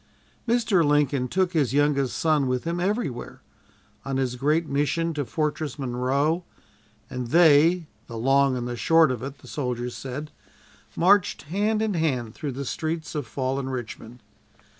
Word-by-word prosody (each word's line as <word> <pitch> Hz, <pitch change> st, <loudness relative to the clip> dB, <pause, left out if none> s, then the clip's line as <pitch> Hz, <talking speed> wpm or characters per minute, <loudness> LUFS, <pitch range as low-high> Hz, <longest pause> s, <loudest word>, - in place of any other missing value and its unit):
Mr. 230 Hz, -6 st, +3 dB
Lincoln 145 Hz, -3 st, +2 dB
took 185 Hz, +4 st, 0 dB
his 145 Hz, -5 st, +1 dB
youngest 145 Hz, -3 st, +1 dB
son 155 Hz, -4 st, +2 dB
with 125 Hz, -1 st, -1 dB
him 170 Hz, +1 st, -2 dB
everywhere 190 Hz, -, -3 dB, 0.6 s
on 135 Hz, -1 st, -2 dB
his 130 Hz, -2 st, -1 dB
great 150 Hz, +6 st, +1 dB
mission 150 Hz, +4 st, 0 dB
to 150 Hz, -2 st, -2 dB
Fortress 150 Hz, +5 st, -2 dB
Monroe, 135 Hz, +6 st, 0 dB, 0.6 s
and 125 Hz, -1 st, -5 dB
they 165 Hz, +3 st, +5 dB, 0.2 s
"the 115 Hz, -, -7 dB
long 135 Hz, +2 st, +3 dB
and 120 Hz, 0 st, -3 dB
the 120 Hz, -, -4 dB
short 160 Hz, +3 st, +4 dB
of 125 Hz, -3 st, -4 dB
it," 135 Hz, +1 st, -6 dB
the -, -, -16 dB
soldiers 125 Hz, -3 st, -3 dB
said 140 Hz, +3 st, -6 dB, 0.6 s
marched 190 Hz, +2 st, +3 dB
hand 210 Hz, +7 st, 0 dB
in 215 Hz, -2 st, 0 dB
hand 130 Hz, -10 st, -1 dB
through 145 Hz, -3 st, -5 dB
the 140 Hz, +2 st, -5 dB
streets 160 Hz, +4 st, -3 dB
of 150 Hz, -5 st, -3 dB
fallen 135 Hz, 0 st, -2 dB
Richmond. 120 Hz, -2 st, -7 dB
145 Hz, 155 wpm, -25 LUFS, 130-165 Hz, 0.6 s, they